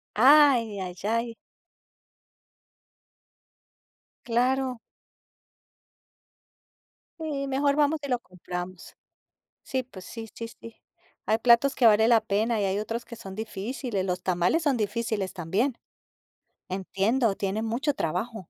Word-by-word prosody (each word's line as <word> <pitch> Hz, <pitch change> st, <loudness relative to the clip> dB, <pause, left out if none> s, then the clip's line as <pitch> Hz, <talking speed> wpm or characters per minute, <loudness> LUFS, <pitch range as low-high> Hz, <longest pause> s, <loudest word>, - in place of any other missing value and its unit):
Ay, 255 Hz, -4 st, +6 dB
ay, 180 Hz, -1 st, -5 dB
ay. 230 Hz, +1 st, 0 dB, 2.9 s
Claro. 250 Hz, +1 st, +1 dB, 2.4 s
Sí, 280 Hz, -3 st, -3 dB
mejor 280 Hz, +1 st, +2 dB
vamos 300 Hz, +1 st, +2 dB
y -, -, -4 dB
lo 250 Hz, -2 st, 0 dB
compramos. 180 Hz, 0 st, -8 dB, 0.7 s
Sí, 260 Hz, -1 st, -1 dB
pues 200 Hz, -7 st, -12 dB
sí, 225 Hz, +2 st, -8 dB
sí, 230 Hz, 0 st, -6 dB
sí. 230 Hz, 0 st, -12 dB, 0.5 s
Hay 220 Hz, -, +2 dB
platos 240 Hz, +4 st, +4 dB
que 245 Hz, -, +2 dB
vale 220 Hz, +1 st, +6 dB
la 230 Hz, -, +6 dB
pena 220 Hz, +1 st, 0 dB
y 200 Hz, -, +1 dB
hay 190 Hz, +1 st, 0 dB
otros 225 Hz, +2 st, -4 dB
que 235 Hz, -, -9 dB
son 195 Hz, -4 st, -9 dB
difíciles, 220 Hz, 0 st, -4 dB
los 180 Hz, -1 st, -2 dB
tamales 180 Hz, -, +1 dB
son 285 Hz, -3 st, +2 dB
difíciles, 220 Hz, -3 st, -2 dB
también. 200 Hz, -, -1 dB, 0.9 s
Entiendo, 195 Hz, +4 st, 0 dB
tienen 205 Hz, +3 st, -2 dB
mucho 250 Hz, +7 st, 0 dB
trabajo. 220 Hz, -, -3 dB
230 Hz, 115 wpm, -27 LUFS, 195-255 Hz, 2.9 s, Ay